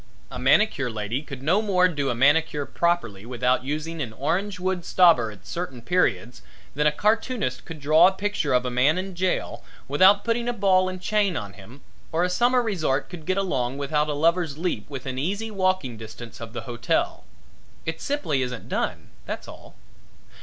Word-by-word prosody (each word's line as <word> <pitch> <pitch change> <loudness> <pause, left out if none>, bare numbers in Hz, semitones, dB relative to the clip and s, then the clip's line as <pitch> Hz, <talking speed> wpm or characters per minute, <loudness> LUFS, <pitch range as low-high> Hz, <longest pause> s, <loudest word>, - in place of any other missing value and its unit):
A - - -6
manicure 175 - +3
lady 110 +3 -3
could 140 -3 -9
no 180 +8 +3
more 185 -4 +3
do 145 -6 -2
a 120 - 0
manicure 145 +3 +3
properly 170 - -1
without 125 +2 0
using 155 +4 -4
an 115 -6 -4
orange 180 - -2
wood 185 -1 -1
stobber 165 -13 +4
at 100 -3 -13
certain 170 -8 -5
periods 125 -8 0 0.3
than 150 +2 +2
a - - +4
cartoonist 210 - 0
could 165 -1 -8
draw 155 +4 +6
a - - +3
picture 205 +2 -2
of 125 0 +2
a 125 - -2
man 135 +7 +3
in 190 +1 -4
jail 180 +1 -2 0.2
without 190 +8 +5
putting 235 +1 0
a - - 0
ball 190 -3 +3
and 185 0 -7
chain 205 -4 +1
on 100 -1 -6
him 110 +9 -14 0.3
or 165 +2 +1
a 180 - 0
summer 245 +4 +3
resort 155 - -1
could 160 -4 -9
get 185 - +1
along 135 -10 -1
without 150 +2 0
a - - 0
Lover's 165 0 +1
Leap 155 - -3
within 130 -2 -5
easy 200 +9 -2
walking 185 - 0
distance 115 +2 -10
of 115 -1 -8
the 120 - -4
hotel. 120 +1 -1 0.6
It 160 0 -4
simply 220 - -1
isn't 125 -2 -4
done, - - -3 0.2
that's - - -5
all. - - -13
155 Hz, 185 wpm, -24 LUFS, 125-185 Hz, 0.6 s, draw